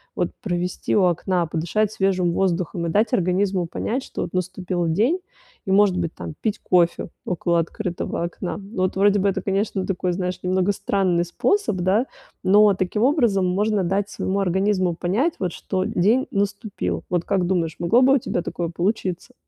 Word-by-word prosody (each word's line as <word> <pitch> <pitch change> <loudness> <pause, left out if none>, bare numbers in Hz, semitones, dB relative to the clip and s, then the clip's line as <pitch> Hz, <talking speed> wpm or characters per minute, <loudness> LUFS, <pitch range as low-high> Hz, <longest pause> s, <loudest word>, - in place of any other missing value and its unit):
вот - - 0
провести 180 -2 -2
у 200 - +4
окна, 175 0 +1
подышать 175 +7 0
свежим 185 -4 +1
воздухом 175 -2 -1
и - - -1
дать 215 +6 +2
организму 185 0 +1
понять, 230 +9 -3
что - - -6
вот 175 - -4
наступил 185 -1 -2
день 225 - +2 0.5
и, 190 - -2
может 195 -2 +4
быть, 170 -2 -2
там, - - -7
пить 215 -2 -1
кофе 175 -2 +2 0.2
около 175 -1 0
открытого 175 0 -3
окна. 175 +2 -4 0.2
Вот 185 0 0
вроде 205 +1 +4
бы 200 +1 +2
это, 190 -1 -2
конечно, 195 0 -1
такой, 180 -1 -1
знаешь, 180 0 -3
немного 185 +2 +1
странный 190 -4 0
способ, 395 - 0
да, 190 +7 +2 0.4
но 205 +1 +6
таким 185 +3 -1
образом 235 - +3
можно 205 +2 +1
дать 195 +3 0
своему 195 +1 -2
организму 190 -1 +1
понять, 215 - 0
вот, 180 -4 -2
что 185 -1 -2
день 220 +5 +2
наступил. 200 +1 -2
Вот 175 -1 0
как 190 -3 +1
думаешь, 170 -4 -1
могло 220 +9 +3
бы 270 - +5
у - - +5
тебя 175 - -2
такое 170 -1 -3
получиться? 185 +4 -2
190 Hz, 175 wpm, -22 LUFS, 175-205 Hz, 0.5 s, но